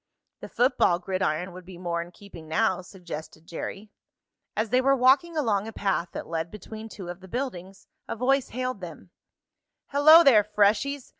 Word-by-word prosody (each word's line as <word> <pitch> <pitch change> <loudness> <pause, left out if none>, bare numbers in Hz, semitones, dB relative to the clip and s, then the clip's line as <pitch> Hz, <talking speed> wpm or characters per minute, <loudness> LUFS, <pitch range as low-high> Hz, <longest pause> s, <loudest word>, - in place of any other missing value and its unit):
"The - - -9
football 245 -8 +2
gridiron 180 -1 -2
would 180 +1 -11
be 180 0 -12
more 170 -1 -2
in 170 - -8
keeping 175 -3 -13
now," 185 +3 +1
suggested 170 -4 -9
Jerry. 195 +5 -7 0.7
As 220 +1 0
they 250 +1 +4
were 275 +1 +4
walking 275 +6 +3
along 215 -8 0
a - - -6
path 195 -4 -1
that - - -5
led 165 0 -3
between 215 +2 -9
two 190 -4 -9
of 175 +1 -7
the 190 - -13
buildings, 195 -5 -6 0.2
a - - -4
voice 265 +3 +1
hailed 255 -3 -4
them: 175 0 -10 0.8
"Hello 310 +4 +8
there, 230 -8 +6
freshies! 210 +7 +1
205 Hz, 170 wpm, -26 LUFS, 175-255 Hz, 0.8 s, Hello